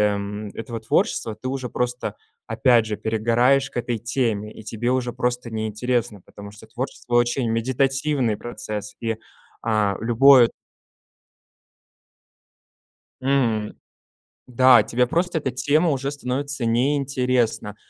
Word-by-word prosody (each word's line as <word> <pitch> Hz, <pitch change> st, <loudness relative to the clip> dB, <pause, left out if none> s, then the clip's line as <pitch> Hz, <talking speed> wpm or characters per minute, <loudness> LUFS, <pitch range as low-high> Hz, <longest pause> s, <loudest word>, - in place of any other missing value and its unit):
м, 105 Hz, +1 st, -5 dB
этого 115 Hz, 0 st, -6 dB
творчества 110 Hz, 0 st, 0 dB
ты -, -, -4 dB
уже 130 Hz, -1 st, -3 dB
просто 125 Hz, +1 st, -3 dB, 0.3 s
опять 120 Hz, -3 st, +3 dB
же 105 Hz, -1 st, -3 dB
перегораешь 115 Hz, +5 st, +2 dB
к -, -, -8 dB
этой 120 Hz, -1 st, -2 dB
теме, 115 Hz, -2 st, -1 dB
и -, -, -12 dB
тебе 115 Hz, +2 st, -3 dB
уже 125 Hz, -2 st, -1 dB
просто 125 Hz, -1 st, -2 dB
неинтересно, 110 Hz, 0 st, -2 dB
потому 100 Hz, 0 st, -11 dB
что 110 Hz, +1 st, -14 dB
творчество 120 Hz, +1 st, -6 dB
очень 120 Hz, 0 st, +2 dB
медитативный 130 Hz, +1 st, 0 dB
процесс, 105 Hz, -3 st, -6 dB
и, 115 Hz, -1 st, -2 dB, 0.4 s
а, 105 Hz, -3 st, +1 dB
любое 120 Hz, +2 st, +6 dB, 2.7 s
М, 120 Hz, -6 st, 0 dB, 0.7 s
да 125 Hz, -2 st, +6 dB
тебе 120 Hz, +3 st, +1 dB
просто 175 Hz, +5 st, 0 dB
эта 140 Hz, -4 st, -2 dB
тема 145 Hz, +6 st, +2 dB
уже 140 Hz, -1 st, -1 dB
становится 135 Hz, -1 st, -3 dB
неинтересна, 125 Hz, -3 st, 0 dB
120 Hz, 115 wpm, -23 LUFS, 110-130 Hz, 2.7 s, любое